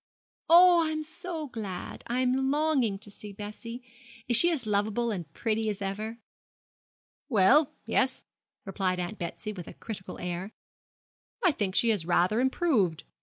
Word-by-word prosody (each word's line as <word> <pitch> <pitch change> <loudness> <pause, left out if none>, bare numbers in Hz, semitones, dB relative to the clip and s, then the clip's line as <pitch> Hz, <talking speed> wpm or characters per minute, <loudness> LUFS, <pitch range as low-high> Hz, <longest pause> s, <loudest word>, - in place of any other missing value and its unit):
'Oh, 345 0 +7
I 315 - -1
am 310 0 -3
so 320 0 -5
glad! 215 -9 -6
I 245 +2 0
am 260 +1 +1
longing 285 -8 +1
to 205 +1 -12
see 205 +1 -9
Bessie. 215 +4 -8 0.4
Is 240 - +3
she 340 +10 +8
as 300 -9 -1
lovable 215 +3 0
and 175 -8 -5
pretty 220 -1 -1
as 205 -1 -3
ever?' 210 +3 -4 1.1
'Well, 260 +7 +4
yes,' 260 0 0 0.4
replied 190 -2 -1
Aunt 180 +4 -4
Betsy, 175 +4 -5
with 180 -4 -9
a - - -10
critical 200 -4 -8
air; 180 +3 -5 0.9
'I 360 - +6
think 200 -9 -2
she 235 - +4
has 210 -7 +1
rather 180 +5 +2
improved. 250 - +1
220 Hz, 155 wpm, -28 LUFS, 195-265 Hz, 1.1 s, she